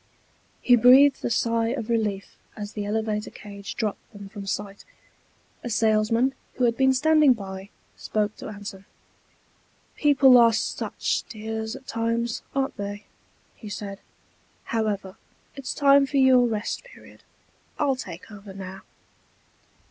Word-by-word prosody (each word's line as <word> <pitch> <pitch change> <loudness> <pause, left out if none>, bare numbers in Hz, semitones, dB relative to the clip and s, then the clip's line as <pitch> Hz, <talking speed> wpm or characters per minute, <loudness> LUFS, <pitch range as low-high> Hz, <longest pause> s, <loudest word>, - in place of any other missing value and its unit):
He 245 - +6
breathed 260 +4 +6
a - - 0
sigh 230 0 +1
of 235 -2 -3
relief 215 -4 -2 0.2
as 205 0 -6
the 205 -1 -4
elevator 215 0 -2
cage 200 -1 -9
dropped 215 -3 -4
them 200 -1 -10
from 200 -1 -9
sight. 200 0 -4 0.8
A 240 - -4
salesman, 225 +3 +2 0.2
who 255 - -1
had 235 -1 +3
been 265 +1 +4
standing 300 +1 +4
by, 195 -3 -8 0.3
spoke 210 -1 -2
to - - -8
Anson. 200 -2 -8 1.1
"People 270 -4 +6
are 230 -1 +6
such 220 - -2
dears 220 +1 -5
at 270 -1 -12
times, 230 0 -2
aren't 270 0 -1
they?" 205 +1 -5 0.5
he 215 - -10
said. 200 -1 -6 0.6
"However, 205 -4 -2 0.4
it's 275 -2 -5
time 280 -1 +5
for 280 - -2
your 260 -2 +5
rest 215 - -3
period. - - -16 0.6
I'll 280 -3 +1
take 185 -5 -9
over 200 -1 -11
now." 190 0 -8
220 Hz, 135 wpm, -25 LUFS, 205-255 Hz, 1.1 s, He